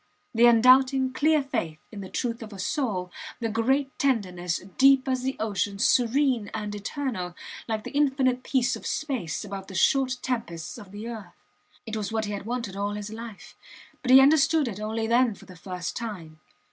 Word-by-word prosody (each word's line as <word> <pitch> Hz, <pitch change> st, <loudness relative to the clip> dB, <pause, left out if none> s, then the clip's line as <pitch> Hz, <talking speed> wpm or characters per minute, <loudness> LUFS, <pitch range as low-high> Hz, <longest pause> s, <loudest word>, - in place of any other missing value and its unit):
the 235 Hz, +1 st, +6 dB
undoubting, 255 Hz, +2 st, +5 dB
clear 305 Hz, +2 st, +3 dB
faith 165 Hz, -, -3 dB
in 205 Hz, -3 st, -7 dB
the 190 Hz, -, -8 dB
truth 235 Hz, +2 st, -3 dB
of 220 Hz, -1 st, -8 dB
a 200 Hz, -, -9 dB
soul 190 Hz, -, -2 dB, 0.3 s
the 230 Hz, -, -1 dB
great 265 Hz, +5 st, 0 dB
tenderness, 180 Hz, -10 st, 0 dB, 0.2 s
deep 270 Hz, 0 st, +6 dB
as 260 Hz, -1 st, 0 dB
the 265 Hz, +1 st, -2 dB
ocean, 205 Hz, -1 st, -1 dB
serene 245 Hz, 0 st, +2 dB
and 210 Hz, -1 st, -4 dB
eternal, 205 Hz, -, -4 dB, 0.3 s
like 220 Hz, -2 st, -2 dB
the -, -, -7 dB
infinite 265 Hz, -3 st, +2 dB
peace 260 Hz, 0 st, +1 dB
of -, -, -7 dB
space 245 Hz, -, -3 dB
above 195 Hz, -1 st, -7 dB
the 190 Hz, -, -9 dB
short 265 Hz, +6 st, +2 dB
tempests 225 Hz, -7 st, -4 dB
of 200 Hz, -4 st, -12 dB
the 210 Hz, +3 st, -7 dB
earth. 210 Hz, -7 st, -9 dB, 0.4 s
It 220 Hz, -1 st, -5 dB
was 215 Hz, -1 st, -3 dB
what 220 Hz, -1 st, -1 dB
he 205 Hz, -, -4 dB
had 200 Hz, +1 st, -5 dB
wanted 235 Hz, -5 st, -3 dB
all 200 Hz, +1 st, -2 dB
his 210 Hz, +1 st, -6 dB
life 225 Hz, -2 st, -9 dB, 0.5 s
but 255 Hz, -, -4 dB
he 260 Hz, +1 st, +10 dB
understood 310 Hz, +1 st, +4 dB
it 210 Hz, -3 st, -5 dB
only 220 Hz, +1 st, -2 dB
then 235 Hz, -1 st, +3 dB
for -, -, -15 dB
the 185 Hz, -, -13 dB
first 180 Hz, 0 st, -6 dB
time. 180 Hz, -10 st, -6 dB
230 Hz, 185 wpm, -26 LUFS, 200-260 Hz, 0.5 s, he